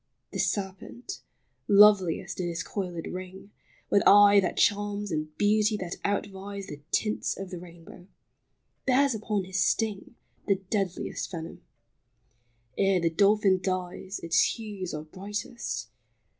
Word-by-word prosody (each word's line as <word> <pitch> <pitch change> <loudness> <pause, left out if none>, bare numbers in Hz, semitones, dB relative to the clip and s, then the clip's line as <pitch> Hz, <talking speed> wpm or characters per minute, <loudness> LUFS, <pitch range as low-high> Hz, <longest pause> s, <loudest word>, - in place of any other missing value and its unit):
The - - -5
serpent 200 - -3 0.2
— - - -46
loveliest 200 -5 +5
in 180 - -1
his 170 0 -3
coiled 180 -5 -4
ring, 185 +2 -8 0.4
With 200 - +5
eye 205 0 +8
that 190 - -1
charms, 205 0 +1
and 155 -1 -3
beauty 210 +1 +3
that 180 -2 -5
outvies 200 0 -3
The 145 0 -8
tints 215 -1 -1
of 195 -1 -7
the 180 - -5
rainbow 175 0 -13 0.4
— - - -49
bears 270 +1 +4
upon 210 -2 -2
his 190 +1 0
sting 220 0 -1 0.3
The 200 - +4
deadliest 195 -1 -3
venom. 165 -2 -7 1.2
Ere 195 -1 +3
the 170 -1 +1
dolphin 200 +1 +4
dies 185 +1 -3
Its 170 +1 +3
hues 205 -5 -6
are 150 - -5
brightest. 205 +8 -5
195 Hz, 135 wpm, -28 LUFS, 180-205 Hz, 1.2 s, eye